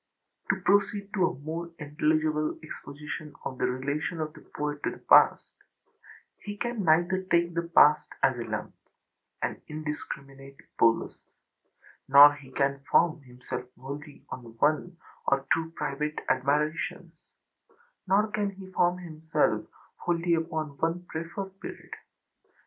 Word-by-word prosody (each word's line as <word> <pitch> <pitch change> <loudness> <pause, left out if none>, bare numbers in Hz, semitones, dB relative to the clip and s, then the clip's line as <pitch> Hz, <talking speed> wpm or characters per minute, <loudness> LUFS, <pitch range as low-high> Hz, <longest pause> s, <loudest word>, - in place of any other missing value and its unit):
To 195 - +2
proceed 205 +1 +2
to 185 -4 +3
a - - -5
more 165 +3 -4
intelligible 155 0 0
exposition 150 0 -8
of 130 - -5
the - - +2
relation 140 +6 -2
of 155 -1 -3
the - - -14
poet 150 0 -3
to - - 0
the - - -8
past: - - +5 0.9
he 205 0 -7
can 240 -2 -2
neither 175 +3 +3
take 170 0 +3
the 170 0 -2
past 150 +1 +6
as - - +4
a - - -2
lump, - - -4 0.7
an - - -2
indiscriminate 140 -3 -7 0.2
bolus, 115 0 +1 0.8
nor 145 +2 +10 0.2
can 140 0 +1
he 140 - -30
form 165 -2 +3
himself 125 -1 -7
wholly 145 +2 -8
on 120 -3 -8
one 155 +6 +1 0.3
or 135 0 +2
two 165 0 -1
private 150 +2 -2
admirations, 150 +5 -1 0.8
nor 200 +3 +4
can 205 -1 0
he 190 -1 -11
form 180 -1 +2
himself 160 -3 -1 0.3
wholly 170 0 0
upon 160 -3 -2
one 170 +2 -1
preferred 185 +4 -6
period. - - -8
155 Hz, 130 wpm, -28 LUFS, 145-175 Hz, 0.9 s, nor